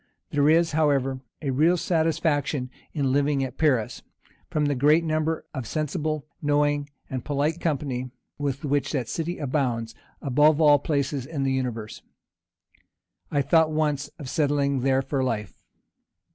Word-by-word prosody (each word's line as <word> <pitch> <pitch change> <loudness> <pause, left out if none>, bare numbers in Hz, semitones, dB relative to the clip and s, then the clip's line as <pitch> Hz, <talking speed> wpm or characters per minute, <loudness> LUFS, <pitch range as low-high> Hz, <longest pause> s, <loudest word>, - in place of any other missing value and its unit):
There 145 0 +3
is, 165 +1 +4
however, 140 -4 +1 0.2
a 140 - 0
real 160 +7 +3
satisfaction 160 -5 0 0.2
in 140 -4 0
living 140 0 +2
at 130 - -6
Paris, 130 -9 +1 0.5
from 150 -1 0
the 145 - +1
great 150 +5 +4
number 155 0 -1
of 130 -5 -5
sensible, 155 0 -2 0.2
knowing, 145 0 +1 0.2
and 130 -2 -4
polite 150 +3 -1
company 135 -5 -2 0.3
with 140 -1 -2
which 140 -1 0
that 130 -6 -1
city 170 +2 -3
abounds 125 -5 -1 0.3
above 150 +3 +3
all 145 -2 +6
places 140 -3 -1
in 150 -4 -3
the 135 - +1
universe. 120 -5 -3 1.3
I 145 -2 +1
thought 160 +3 +4
once 150 -2 0
of 145 - -8
settling 140 -2 +1
there 135 +1 +2
for 135 0 -1
life. 105 -6 -3
145 Hz, 145 wpm, -25 LUFS, 135-155 Hz, 1.3 s, all